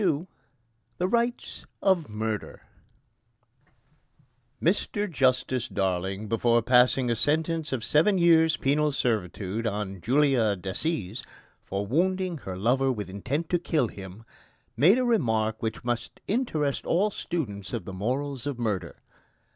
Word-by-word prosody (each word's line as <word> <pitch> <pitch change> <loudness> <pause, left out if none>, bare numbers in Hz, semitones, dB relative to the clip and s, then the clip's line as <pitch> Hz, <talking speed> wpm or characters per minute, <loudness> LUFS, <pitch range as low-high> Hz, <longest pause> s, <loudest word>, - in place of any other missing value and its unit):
XXII 170 -4 +1 0.7
THE 180 - 0
RIGHTS 235 +3 -1 0.2
OF 180 - +2
MURDER 110 0 -4 2.0
Mr 205 +3 0
Justice 130 - +1
Darling, 95 +2 -2
before 115 +1 +2
passing 125 +1 +4
a - - +2
sentence 160 +4 0
of 130 -4 -2
seven 165 - +3
years' 160 -2 +5
penal 150 +2 +2
servitude 110 -3 -1
on 100 -3 -4
Julia 125 - +3
Decies 100 - -3 0.4
for 100 +1 -3
wounding 180 - 0
her 95 -7 -6
lover 130 +6 +2
with 105 -6 -5
intent 135 - -3
to 175 - +3
kill 155 -8 0
him, 95 +2 -10 0.5
made 165 - +5
a 255 - +1
remark 110 - +1
which 110 +1 -3
must 120 -1 -3
interest 160 - -1
all 200 +5 +2
students 105 - -4
of 120 - -4
the 95 - -7
morals 130 +7 -2
of 140 -4 -3
murder. 100 -8 -3
125 Hz, 130 wpm, -27 LUFS, 105-160 Hz, 2.0 s, years